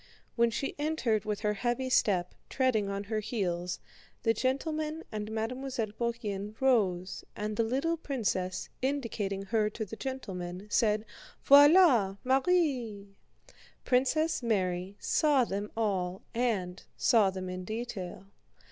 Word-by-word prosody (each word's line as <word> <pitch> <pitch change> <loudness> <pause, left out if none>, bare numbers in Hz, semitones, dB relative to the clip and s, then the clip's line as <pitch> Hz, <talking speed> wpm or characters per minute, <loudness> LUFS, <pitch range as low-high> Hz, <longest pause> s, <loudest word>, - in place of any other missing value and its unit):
When 235 -1 +4
she 235 +4 -3
entered 260 -9 0
with 210 -1 -2
her 210 -1 +1
heavy 240 +4 -1
step, 185 -8 +2 0.2
treading 240 -7 +1
on 200 0 -3
her 215 +1 -2
heels, 180 -5 -2 0.4
the 225 - +3
gentlemen 305 +6 -1
and 210 -1 -4
Mademoiselle 230 0 -3
Bourienne 215 -3 -3
rose 195 -9 +1
and 210 0 -3
the 230 - +2
little 275 +9 0
princess, 200 - -2
indicating 230 -8 -2
her 210 +1 +1
to 220 +1 -5
the 210 - -8
gentlemen, 190 -9 -5
said: 215 -1 +2 0.4
"Voilà 285 - +7
Marie!" 260 - +1 0.7
Princess 270 +6 +2
Mary 190 -4 -1
saw 295 -5 +3
them 205 -1 -3
all 190 -4 -1
and 205 -7 -1 0.2
saw 220 -5 +4
them 185 -1 -5
in 185 0 -5
detail. 215 -3 -5
220 Hz, 125 wpm, -30 LUFS, 195-260 Hz, 0.7 s, Voilà